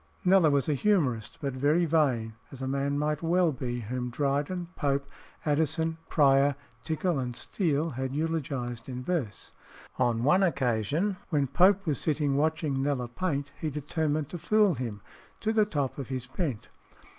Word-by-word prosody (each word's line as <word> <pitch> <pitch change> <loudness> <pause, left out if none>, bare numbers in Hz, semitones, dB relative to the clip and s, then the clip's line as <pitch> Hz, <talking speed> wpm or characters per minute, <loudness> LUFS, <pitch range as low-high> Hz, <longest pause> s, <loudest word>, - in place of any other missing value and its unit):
Kneller 185 -3 +6
was 140 -2 +1
a 150 - +2
humorist, 140 - +1
but 140 -2 -2
very 145 +6 +2
vain, 135 -9 +1 0.2
as 135 - -10
a 130 - -3
man 140 +1 0
might 150 0 0
well 170 0 +3
be 125 -2 -4
whom 125 +3 -3
Dryden, 145 +7 -1
Pope, 140 -2 0 0.4
Addison, 160 +2 +1
Prior, 140 -1 +4 0.3
Tickell, 160 -1 0
and 125 -2 -3
Steele 160 - -1
had 130 0 -3
eulogised 135 -6 -3
in 125 0 -5
verse. 130 - -3 0.5
On 120 -2 +2
one 180 +8 +4
occasion, 145 - +1
when 145 -5 +2
Pope 190 +8 +4
was 150 -5 0
sitting 145 -3 +1
watching 150 -2 0
Kneller 135 -3 -1
paint, 145 -1 -2
he 155 - -1
determined 150 0 -2
to 175 - -6
fool 210 +2 +3
him 115 -7 -5 0.4
"to 220 0 0
the 215 -1 +4
top 145 -9 -2
of 135 - -5
his 130 -2 -4
bent." 135 - -3
145 Hz, 160 wpm, -28 LUFS, 130-165 Hz, 0.5 s, Kneller